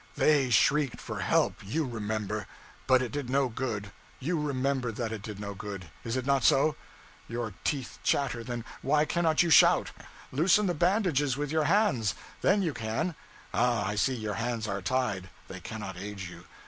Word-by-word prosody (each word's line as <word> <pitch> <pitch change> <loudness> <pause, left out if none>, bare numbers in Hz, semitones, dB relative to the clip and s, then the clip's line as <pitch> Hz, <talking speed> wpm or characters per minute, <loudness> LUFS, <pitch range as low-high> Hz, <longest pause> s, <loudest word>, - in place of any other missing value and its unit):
they 145 -4 +3
shrieked 135 +4 +3
for - - -6
help, - - +2
you 150 +11 -1
remember; 110 -3 -3 0.4
but 130 -1 +5
it 125 - -4
did 145 -4 -4
no 135 0 +2
good; 110 -4 -4 0.3
you 165 +5 -1
remember 135 -3 0
that 115 +1 -3
it 110 -2 -5
did 105 -2 -7
no 100 0 -5
good, 100 -5 -7
is 115 +2 -2
it 130 - -2
not 140 -2 +2
so? 140 +4 +4 0.5
Your 115 -2 -4
teeth 125 -6 -2
chatter 130 -4 0
then 120 -1 -5 0.2
why 150 +2 +3
cannot 165 -1 +2
you 170 - 0
shout? - - +6 0.4
Loosen 180 +9 +4
the 180 - +1
bandages 165 - +2
with 145 0 -2
your 155 -1 +2
hands 155 - +2 0.3
then 200 +1 +3
you 165 -5 0
can. 115 +11 -2 0.4
Ah, 120 -3 +2
I 105 - -1
see 130 +6 +1
your 110 -3 -3
hands 115 -2 -2
are 100 -1 -2
tied, 100 -4 -1 0.2
they 95 - -8
cannot 95 -1 -6
aid 100 0 -6
you. 90 -1 -8
125 Hz, 180 wpm, -29 LUFS, 105-145 Hz, 0.5 s, shout